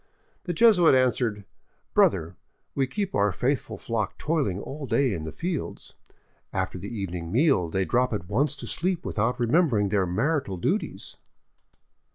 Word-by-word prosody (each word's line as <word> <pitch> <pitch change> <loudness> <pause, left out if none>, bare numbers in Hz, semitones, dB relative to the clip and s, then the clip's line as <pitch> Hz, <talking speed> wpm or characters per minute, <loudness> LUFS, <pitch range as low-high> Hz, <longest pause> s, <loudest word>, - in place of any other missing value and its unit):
The 175 - -2
Jesuit 180 - +6
answered: 120 -5 +1 0.2
" - - -44
Brother, 85 -2 +3 0.4
we 135 -1 0
keep 200 +6 -3
our 100 0 +2
faithful 125 +1 -1
flock 110 -1 -3
toiling 140 - -1
all 140 +5 -7
day 135 -4 +2
in 80 -4 -4
the 80 - -5
fields. 165 - -5 0.6
After 95 -1 -2
the 100 - -6
evening 90 -6 -5
meal 125 - +3
they 95 +3 0
drop 125 +4 +1
at 100 -6 -3
once 140 +9 +1
to 135 - -8
sleep 180 0 -1
without 120 +4 -1
remembering 120 - +2
their 95 -2 +1
marital 130 - 0
duties. 85 - -3
115 Hz, 155 wpm, -26 LUFS, 95-145 Hz, 0.6 s, Jesuit